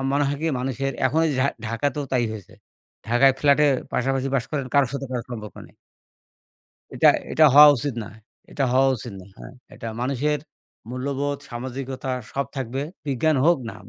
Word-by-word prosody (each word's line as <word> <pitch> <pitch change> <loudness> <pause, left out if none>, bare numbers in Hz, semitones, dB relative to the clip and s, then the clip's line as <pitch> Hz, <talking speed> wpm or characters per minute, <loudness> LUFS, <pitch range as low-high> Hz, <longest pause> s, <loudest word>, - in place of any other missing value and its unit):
মনে 145 +1 +2
হয় 145 - -2
কি? - - 0
মানুষের, 135 +1 -2
এখন 155 +5 +1
এই - - 0
ঢাক 140 +2 +2
ঢাকাতেও 140 +6 -2
তাই 125 -2 +2
হয়েছে। 105 -5 -10 0.6
ঢাকায় 125 +3 +5
ফ্ল্য্যাটে 145 +1 +4 0.3
পাশাপাশি 135 +1 0
বাস 125 - +1
করেন, 140 -3 -2
কারোর 140 -3 +4
সাথে 140 -1 -4
কারো 120 -2 -3
সম্পর্ক 105 -6 -7
নেই। - - -22 1.2
এটা, - - +5 0.2
এটা 155 - +5
হওয়া 150 +1 +10
উচিত 130 +2 -3
না, - - -10 0.4
এটা 140 - -1
হওয়া 135 +1 +4
উচিত 120 0 -8
না 90 - -14
হ্যাঁ, - - -10 0.2
এটা - - -8
মানুষের 140 +4 0 0.5
মূল্যবোধ, 140 +2 -2
সামাজিকতা 130 +2 -5 0.2
সব 140 -1 -2
থাকবে, 130 +1 -3 0.2
বিজ্ঞান 140 +3 +1
হোক 170 0 +4
না - - -10
135 Hz, 170 wpm, -23 LUFS, 125-140 Hz, 1.2 s, হওয়া